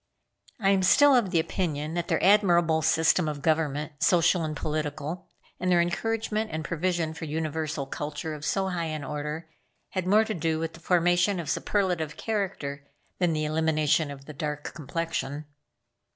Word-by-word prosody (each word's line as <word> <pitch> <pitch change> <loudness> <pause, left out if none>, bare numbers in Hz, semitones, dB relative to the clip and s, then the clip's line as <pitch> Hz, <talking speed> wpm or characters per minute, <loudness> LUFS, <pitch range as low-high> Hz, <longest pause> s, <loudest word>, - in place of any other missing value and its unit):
I 195 -2 +3
am 195 -1 +3
still 285 +10 +6
of 235 -6 +3
the 175 -2 +2
opinion 160 -3 -2
that 175 0 -2
their - - 0
admirable 175 -5 +4
system 160 +1 +3
of 145 -2 -6
government, 155 -2 0
social 175 -1 +4
and 155 -1 -3
political, 150 +2 -3 0.3
and 185 - 0
their 175 - +5
encouragement 220 +5 -1
and 155 0 -4
provision 170 -1 -1
for 165 0 -6
universal 155 -1 -2
culture 150 +3 -5
of 150 -1 -8
so 190 +5 0
high 170 -2 -2
an 155 -2 -4
order, 150 +3 -4 0.4
had 185 -2 -3
more 215 +3 +5
to 220 - -2
do 160 -2 -1
with 165 0 -3
the - - -12
formation 175 +2 +2
of 165 -2 -2
superlative 175 -5 -1
character 165 -10 -3 0.3
than 175 -3 +2
the 155 0 -1
elimination 155 0 +1
of 140 -1 -9
the 150 - -9
dark 150 +1 -4
complexion. 150 -1 -3
160 Hz, 165 wpm, -27 LUFS, 150-180 Hz, 0.4 s, still